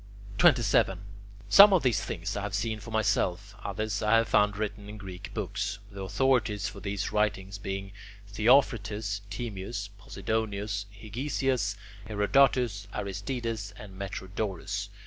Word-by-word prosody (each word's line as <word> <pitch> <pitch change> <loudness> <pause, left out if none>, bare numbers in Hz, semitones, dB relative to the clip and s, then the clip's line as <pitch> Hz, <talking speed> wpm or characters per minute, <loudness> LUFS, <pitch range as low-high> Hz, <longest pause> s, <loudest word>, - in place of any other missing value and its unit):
27. 100 -6 +4 0.5
Some 200 0 +9
of 185 - +4
these 125 -4 +2
things 85 +3 -4
I 100 - -2
have 100 0 -3
seen 110 +1 -1
for 115 - -10
myself, 100 -2 0
others 100 0 -2
I 105 +1 +4
have 115 0 +1
found 105 -1 +3
written 105 -1 -4
in 105 - -8
Greek 95 -3 -8
books, 100 0 -2
the 100 -1 -7
authorities 105 +1 +1
for - - -7
these 100 0 -3
writings 105 -2 0
being 95 0 -4 0.4
Theophrastus, 105 -2 +2
Timaeus, 100 -2 -5
Posidonius, 100 0 -2
Hegesias, 115 0 -1 0.3
Herodotus, 110 -1 +2
Aristides, 105 +2 -4
and 100 -3 -10
Metrodorus. 95 0 -4
105 Hz, 125 wpm, -29 LUFS, 100-110 Hz, 0.5 s, Some